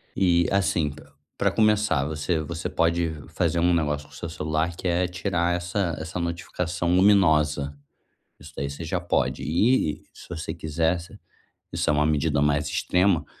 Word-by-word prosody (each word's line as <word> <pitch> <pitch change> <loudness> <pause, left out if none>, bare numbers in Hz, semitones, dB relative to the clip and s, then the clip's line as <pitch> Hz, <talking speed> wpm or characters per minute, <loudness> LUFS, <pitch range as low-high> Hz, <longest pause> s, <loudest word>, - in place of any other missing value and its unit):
E 85 -2 +3
assim, 90 -6 +1
pr 70 - -13 0.3
pra - - +2
começar, 105 -10 +2
você 80 +2 -1
você 85 +2 -4
pode 85 0 +1 0.2
fazer 85 - 0
um 90 +1 +3
negócio 75 -3 -1
com - - -20
seu 85 - -6
celular 80 +1 -1
que 95 - -4
é 90 +1 +2
tirar 90 -1 -1
essa 90 -1 -1
essa 80 +3 -5
notificação 85 +1 -2
luminosa. 75 -7 +3 0.6
Isso 70 +1 -12
daí 70 0 -3
você 70 +4 -7
já 85 +3 -1
pode 85 - -1
e, 85 - +1
se - - -14
você 80 -2 -4
quiser 80 +3 0
você 85 - -12 0.6
isso - - 0
é - - +4
uma 75 0 +2
medida 75 -1 +1
mais 75 0 +2
extrema, 90 +1 +2
85 Hz, 165 wpm, -25 LUFS, 75-90 Hz, 0.6 s, é